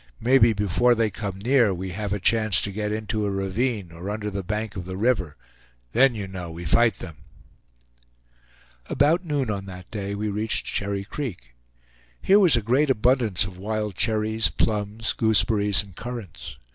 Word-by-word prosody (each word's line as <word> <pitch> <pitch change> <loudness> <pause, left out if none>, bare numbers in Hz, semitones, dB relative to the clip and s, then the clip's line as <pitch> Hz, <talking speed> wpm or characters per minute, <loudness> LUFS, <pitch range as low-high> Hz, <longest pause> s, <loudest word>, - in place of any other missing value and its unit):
Maybe 120 -1 +4
before 105 +4 +2
they 110 -2 0
come 100 -3 -5
near, 120 +1 +3
we 95 +1 -5
have 100 +2 -4
a 105 - -1
chance 110 +1 +3
to 100 - -2
get 105 +1 -3
into 110 0 -2
a 100 - 0
ravine, 100 0 -2
or 85 +4 -7
under 105 0 -4
the 100 0 -3
bank 105 +2 -4
of 90 -3 -6
the 95 0 -6
river; 100 -9 0 0.5
then, 125 +1 +4
you 100 -3 -5
know, 90 -3 -7
we 85 +1 -8
fight 115 +7 +3
them." 80 -5 -10 1.7
About 165 +5 +2
noon 145 -8 -1
on 100 -1 -5
that 90 -1 -11
day 100 -2 -4
we 105 +1 -3
reached 110 +2 -1
Cherry 100 -1 -2
Creek. 100 - -7 0.7
Here 200 +2 +4
was 170 -11 +5
a 115 - -2
great 130 +7 +2
abundance 120 -5 +2
of 90 -2 -10
wild 105 +1 -3
cherries, 110 +2 +1
plums, 105 +1 -1
gooseberries, 105 -2 +3
and 100 -3 -16
currants. 115 - -8
105 Hz, 170 wpm, -24 LUFS, 95-115 Hz, 1.7 s, was